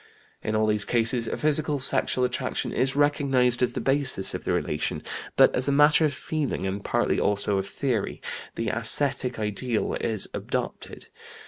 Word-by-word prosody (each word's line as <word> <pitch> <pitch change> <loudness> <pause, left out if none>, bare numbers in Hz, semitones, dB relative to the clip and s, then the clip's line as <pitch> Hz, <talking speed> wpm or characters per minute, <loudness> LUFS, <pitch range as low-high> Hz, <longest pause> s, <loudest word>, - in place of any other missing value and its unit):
"In 110 - -3
all 110 0 +2
these 105 -1 +2
cases 115 +1 0
a - - -3
physical 150 0 +1
sexual 130 -1 +2
attraction 125 +1 -3
is 135 +1 0
recognized 135 -4 +2
as 125 -1 +1
the - - -3
basis 135 -8 +1
of - - -6
the - - -1
relation, 75 - -2 0.3
but - - +5
as 125 - -1
a - - +2
matter 150 +3 +4
of 150 - +1
feeling, 145 -3 -3
and 100 +1 -4
partly - - 0
also 100 -1 +1
of 95 - -4
theory, 125 -7 -2 0.4
the 115 - -2
ascetic 125 +2 +2
ideal 110 +2 -2
is 110 -4 -1
adopted. - - -5
125 Hz, 165 wpm, -25 LUFS, 110-140 Hz, 0.4 s, but